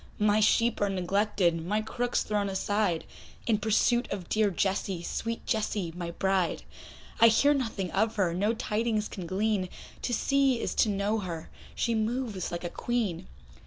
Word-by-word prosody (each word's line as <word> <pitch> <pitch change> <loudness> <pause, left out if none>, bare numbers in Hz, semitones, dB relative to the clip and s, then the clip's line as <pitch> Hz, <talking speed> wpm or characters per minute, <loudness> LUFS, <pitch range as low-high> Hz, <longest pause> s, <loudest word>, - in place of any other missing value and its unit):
My 210 0 +3
sheep 230 +2 +3
are 205 - +2
neglected, 185 -2 +1
my 205 +5 0
crook's 245 +2 -1
thrown 205 -1 -1
aside, 195 -2 0 0.4
In 220 -3 +2
pursuit 240 +3 +2
of 190 -4 -5
dear 215 -1 +3
Jessie, 190 -1 -1
sweet 230 +5 -3
Jessie, 210 -6 -1
my 175 -1 -4
bride; 190 0 0 0.6
I 230 - +9
hear 280 +6 +5
nothing 225 -9 -2
of 220 +3 +1
her, 185 -5 +1
no 205 +6 +1
tidings 215 -1 -1
can 180 -3 -7
glean, 195 0 0 0.3
To - - -2
see 270 +1 +2
is - - -2
to 220 - +3
know 205 +2 0
her, 170 -5 -6 0.2
she 235 - 0
moves 220 -3 -2
like 170 0 -4
a 175 - -2
Queen. 225 -9 -2
210 Hz, 160 wpm, -29 LUFS, 185-225 Hz, 0.6 s, I